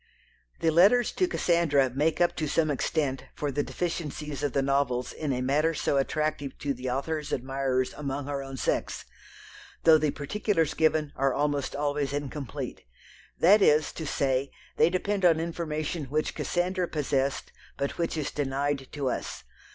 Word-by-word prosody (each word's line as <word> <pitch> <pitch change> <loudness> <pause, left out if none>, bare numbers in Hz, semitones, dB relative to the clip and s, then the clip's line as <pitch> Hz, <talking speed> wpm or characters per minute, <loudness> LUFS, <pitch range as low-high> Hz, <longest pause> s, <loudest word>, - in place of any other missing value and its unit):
The 165 - +3
letters 205 +9 +5
to 370 - +1
Cassandra 165 - +2
make 150 +5 +1
up 175 0 +3
to 155 - -1
some 155 0 +2
extent 140 -1 -1
for 145 -1 -2
the 145 +2 0
deficiencies 150 -4 -4
of 145 -3 -1
the 135 - +2
novels 135 -2 0
in 150 -3 -3
a 125 -1 -1
matter 150 +5 +2
so 140 - 0
attractive 145 0 -1
to 140 -1 -2
the 130 0 -5
author's 150 +4 -2
admirers 130 0 -1
among 140 -1 -4
her 140 -1 -3
own 135 -1 -7
sex, - - -1 0.8
though 160 -1 +7
the 155 0 +1
particulars 165 +2 0
given 155 -2 +1
are 135 -1 +1
almost 145 -1 0
always 145 -1 -1
incomplete; 145 -3 -5 0.6
that 200 +5 +6
is 155 -4 +4
to 160 - -6
say, 135 -1 0 0.3
they - - +5
depend 195 +2 -1
on 165 -3 +5
information 160 -2 -3
which 150 +4 -1
Cassandra 180 +1 -1
possessed, 140 -3 -1 0.3
but 140 +4 -3
which 165 -1 -1
is 145 -2 -2
denied 140 -1 -1
to 140 -3 -2
us. - - -3
145 Hz, 160 wpm, -28 LUFS, 135-160 Hz, 0.8 s, though